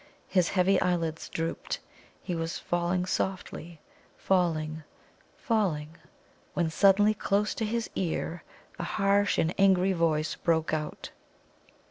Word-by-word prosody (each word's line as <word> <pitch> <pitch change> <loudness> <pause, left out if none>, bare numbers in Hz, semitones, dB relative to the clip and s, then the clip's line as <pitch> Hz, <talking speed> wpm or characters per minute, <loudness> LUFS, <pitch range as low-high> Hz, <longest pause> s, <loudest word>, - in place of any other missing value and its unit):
His 180 -3 +2
heavy 190 0 +3
eyelids 165 -3 -1
drooped. 165 0 -3 0.5
He 180 - -3
was 165 0 -2
falling 175 +1 -1
softly 175 -3 -3 0.4
falling, 160 -4 0 0.6
falling 165 - -1 0.6
when 170 -3 +1
suddenly, 205 +4 +5
close 205 0 0
to 220 - -2
his 230 +1 -1
ear, 170 -1 -2 0.4
a - - -2
harsh 200 +3 +2
and 165 +2 +1
angry 190 -1 +4
voice 155 -3 +1
broke 160 -2 +1
out. 155 -1 -4
175 Hz, 115 wpm, -28 LUFS, 165-195 Hz, 0.6 s, suddenly